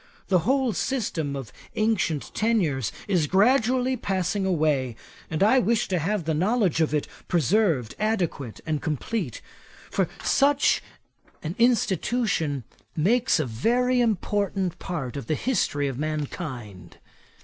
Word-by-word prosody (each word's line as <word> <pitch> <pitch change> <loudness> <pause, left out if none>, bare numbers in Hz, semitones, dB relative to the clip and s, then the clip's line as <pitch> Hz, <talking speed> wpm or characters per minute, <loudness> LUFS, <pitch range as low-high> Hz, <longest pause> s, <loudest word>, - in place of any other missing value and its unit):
The 185 -2 +4
whole 265 -4 +2
system 170 - -2
of 135 -5 -7 0.2
ancient 210 -9 0
tenures 175 - +1 0.2
is 180 -7 +2
gradually 250 - +3
passing 195 -2 -1
away; 150 -8 +1 0.3
and 160 +4 0
I 255 +6 +5
wish 230 -2 +1
to 185 -2 +1
have 195 +4 -1
the 160 - 0
knowledge 190 +1 +2
of 155 - +2
it 150 -1 0 0.2
preserved 165 - +2
adequate 180 - -1
and 155 -2 -1
complete. 165 - -3 0.5
For - - +1
such 285 0 +3 0.6
an 160 +1 -3
institution 215 - +1 0.3
makes 225 +7 +2
a 155 - +1
very 245 - +1
important 200 -4 0
part 145 -10 -4
of 140 - -6
the 155 - +1
history 145 - 0
of 135 -1 -4
mankind. 130 - -5
180 Hz, 125 wpm, -25 LUFS, 150-225 Hz, 0.6 s, I